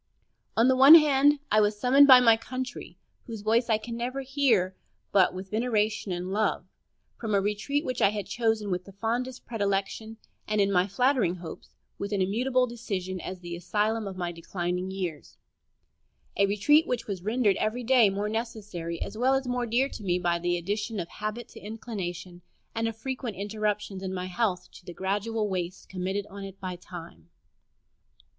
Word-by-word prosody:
On 230 +2 +5
the 260 - +4
one 270 +5 +10
hand, 290 -2 +5
I 215 +1 +5
was 210 0 +1
summoned 270 +4 +6
by 260 -2 +10
my 230 -2 +6
Country, 255 +2 -6 0.3
whose 225 -3 -6
voice 230 +3 +2
I 220 - +4
can 230 +2 -7
never 250 +3 -3
hear 255 -9 +1 0.4
but 190 -2 +4
with 185 +1 -8
veneration 215 -3 0
and 180 +1 -3
love, 215 +1 0 0.5
from 220 -3 -1
a - - +4
retreat 210 - -1
which 255 -1 -3
I - - +6
had 205 -2 -4
chosen 220 -1 -1
with 180 0 -2
the 195 - -13
fondest 240 +5 -3
predilection, 205 0 -2 0.3
and, 215 0 0
in 200 0 +3
my 180 0 +3
flattering 245 -3 +2
hopes, 175 -2 -10 0.2
with 200 +1 -3
an 200 - 0
immutable 250 +7 +1
decision, 195 -6 -4
as 185 -1 -7
the 175 -1 -6
asylum 210 +5 -1
of 190 -1 -7
my 175 -1 -2
declining 175 +2 -3
years 180 -6 -5 1.0
a 200 - +3
retreat 295 - +4
which 235 -2 -2
was 195 -4 -5
rendered 215 0 +1
every 225 +3 -1
day 240 -3 +5
more 200 +2 -2
necessary 210 -7 -4
as 215 - -8
well 260 +2 +3
as 270 0 -1
more 245 -1 -1
dear 245 +4 +2
to 215 - -9
me 180 -2 +1
by 175 -1 0
the 175 0 0
addition 210 +5 -3
of 170 - -4
habit 215 +3 -5
to - - -12
inclination, 185 -5 -6 0.3
and 225 0 -1
of 225 - -4
frequent 255 -2 -4
interruptions 210 -1 -3
in 190 -1 -4
my 180 0 -3
health 185 -1 -1
to - - -15
the 175 -1 -10
gradual 210 +3 -1
waste 185 -1 -4
committed 190 +2 -3
on 200 0 -8
it 195 0 -9
by 185 -1 -5
time. 170 - -11
210 Hz, 185 wpm, -27 LUFS, 185-235 Hz, 1.0 s, one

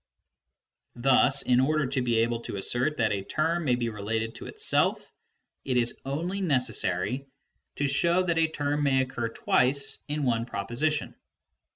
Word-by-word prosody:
Thus 135 +2 +4
in 125 0 +3
order 150 +3 +2
to 130 0 -1
be 120 -2 +2
able 115 0 0
to - - -6
assert 120 +9 0
that 110 -2 +1
a 100 - -1
term 160 - -1
may 125 -3 +3
be 120 -1 -2
related 110 +1 -3
to - - -8
itself, - - 0 0.5
it 130 -2 0
is 120 0 +1
only 170 +8 -3
necessary 125 - 0 0.5
to 145 - -1
show 170 +6 +2
that 170 -2 0
a 160 - +4
term 145 -1 -2
may 135 -2 +3
occur 120 -3 -4
twice 130 +4 +1
in 150 0 -2
one 115 -3 +1
proposition. 120 +10 -1
130 Hz, 160 wpm, -27 LUFS, 120-150 Hz, 0.5 s, Thus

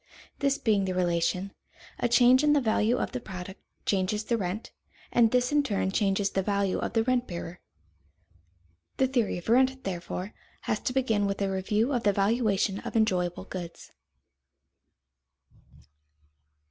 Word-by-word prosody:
This 280 0 +1
being 210 -6 +1
the 185 -1 -2
relation, 180 +2 0 0.5
a 245 - +1
change 250 +3 +5
in 295 0 +4
the 295 - +4
value 225 -1 +1
of - - -2
the 255 - -3
product 190 -3 -9 0.2
changes 200 +2 0
the 235 - 0
rent, 200 0 -4 0.4
and 235 -2 +4
this 250 +2 +1
in 295 0 +4
turn 200 -8 -1
changes 195 0 +1
the 195 - 0
value 200 -1 0
of - - -3
the 225 -1 +2
rent 250 0 0
bearer. 170 0 -7 1.4
The 265 - +3
theory 250 -7 0
of 175 - -9
rent, 260 +3 +3
therefore, 180 +1 -5 0.3
has 215 - -1
to 250 - -3
begin 225 -6 +1
with 200 0 -3
a 195 -1 0
review 210 +7 0
of 245 - 0
the 205 -2 +2
valuation 200 -1 +1
of - - -7
enjoyable 185 -5 +1
goods. 175 -3 -8
210 Hz, 155 wpm, -28 LUFS, 190-245 Hz, 1.4 s, change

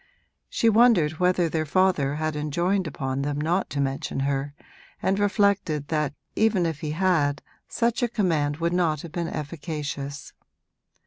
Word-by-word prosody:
She 230 - +1
wondered 215 -9 +4
whether 180 -1 +3
their 160 -1 -1
father 155 -5 +2
had 155 0 -2
enjoined 170 +5 0
upon 135 -2 -3
them 145 +1 -2
not 170 +5 0
to 145 - -3
mention 135 0 -2
her, 140 +1 -1 0.4
and 195 +1 0
reflected 200 -8 +1
that 150 -3 -1 0.2
even 215 -5 +2
if 160 -3 -2
he 155 - -4
had 155 -4 +1 0.2
such 235 0 0
a 245 - +3
command 160 -9 0
would 170 +1 0
not 165 -5 +1
have 170 - -8
been 170 0 -2
efficacious. 145 -3 -5
160 Hz, 150 wpm, -25 LUFS, 145-185 Hz, 0.4 s, wondered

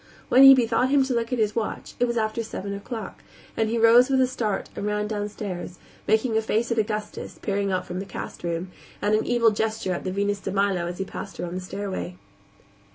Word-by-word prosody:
When 255 - +6
he 270 0 +11
bethought 245 0 +2
him 280 0 +4
to 265 -1 -1
look 235 0 -1
at 250 - 0
his 215 -2 +1
watch, 225 -2 -3
it 245 - +4
was 235 -1 -2
after 220 +1 0
seven 200 -3 -5
o'clock, 205 +1 -7 0.3
and 220 -1 +1
he 230 - 0
rose 230 +3 +6
with 265 -1 +3
a 260 - +5
start 230 -6 -2
and 205 - -3
ran 210 0 0
downstairs, 205 -4 -5 0.3
making 220 +2 +2
a 220 - +3
face 225 +2 0
at 230 - +1
Augustus, 210 -1 -3
peering 200 -1 0
out 185 - -1
from 180 +1 -5
the 195 - -5
cast 195 - -7
room, 170 +2 -3 0.3
and 210 - +1
an 215 - +3
evil 235 -2 +4
gesture 220 -3 -1
at - - -4
the 185 - -2
Venus 200 +1 0
de 195 - -4
Milo 195 -3 +1
as 175 0 -5
he 195 - -2
passed 195 - -8
her - - -3
on 175 - -6
the 185 - -4
stairway. 190 - -5
210 Hz, 230 wpm, -25 LUFS, 195-230 Hz, 0.3 s, he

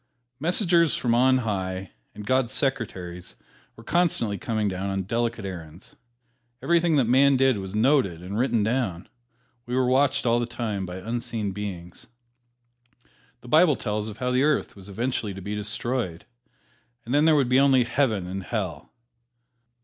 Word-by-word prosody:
"Messengers 170 0 +2
from 120 -2 0
on 130 +2 +4
high" 95 -3 -3 0.2
and 105 0 -8
God's 130 0 +1
secretaries 95 -10 -3 0.4
were 115 - -14
constantly 150 -9 +1
coming 110 -3 -1
down 95 0 -3
on 95 0 -2
delicate 115 +1 -2
errands. 85 -2 -9 0.6
Everything 170 -1 +2
that 140 - +4
man 135 +3 +4
did 130 -4 +3
was 95 +1 -6
noted 110 - +2
and 95 +3 -6
written 120 -2 +1
down. 110 -7 -1 0.6
We 125 - -2
were 130 0 +2
watched 135 +2 +2
all 120 0 +3
the 120 - -2
time 110 -5 -4
by 90 - -7
unseen 115 +1 -3
beings. 95 -4 -7 1.3
The - - -14
Bible 155 +3 +5
tells 105 -2 -3
of 105 - -9
how 125 +1 -1
the 125 +1 +2
Earth 150 0 +1
was 100 0 -12
eventually 110 -1 -2
to - - -7
be 100 +3 -5
destroyed, 105 -3 -3 0.8
and 120 - -4
then 145 +2 +4
there 160 -1 +5
would 140 -4 +2
be 125 +2 +4
only 135 -2 +5
Heaven 115 -6 0
and 95 +2 -5
Hell. 90 -7 -4
115 Hz, 160 wpm, -25 LUFS, 95-130 Hz, 1.3 s, Bible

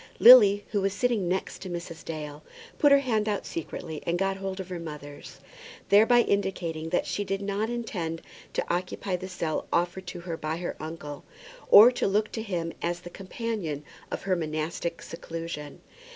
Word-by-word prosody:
Lily, 205 -5 +9
who 205 - 0
was 195 0 0
sitting 225 -4 0
next 185 +2 -2
to 190 - -6
Mrs. 170 -2 -6
Dale, 150 -2 -6 0.4
put 290 - +5
her 280 - +9
hand 220 -5 0
out 205 - -2
secretly 160 -1 -6
and 170 +1 0
got 195 +1 0
hold 195 0 -4
of 190 -1 -6
her 180 -2 -4
mother's, 150 -3 -9 0.5
thereby 225 +4 +6
indicating 175 -7 -1
that 175 - +1
she 205 - -2
did 195 0 -2
not 200 +2 -2
intend 180 -9 -4 0.3
to - - -1
occupy 180 +1 -2
the 185 +1 -6
cell 165 -4 -3
offered 175 +2 0
to 180 -1 -6
her 170 -1 -4
by 155 +1 -3
her 175 0 -4
uncle; 155 -2 -7 0.5
or 220 +5 +10
to 245 - -1
look 210 +2 +1
to 225 - -4
him 175 -6 -3
as 175 0 -2
the 175 - -10
companion 195 - -4 0.3
of - - -5
her 190 -2 +1
monastic 160 +1 -3
seclusion. 165 -3 -7
180 Hz, 180 wpm, -27 LUFS, 165-205 Hz, 0.5 s, or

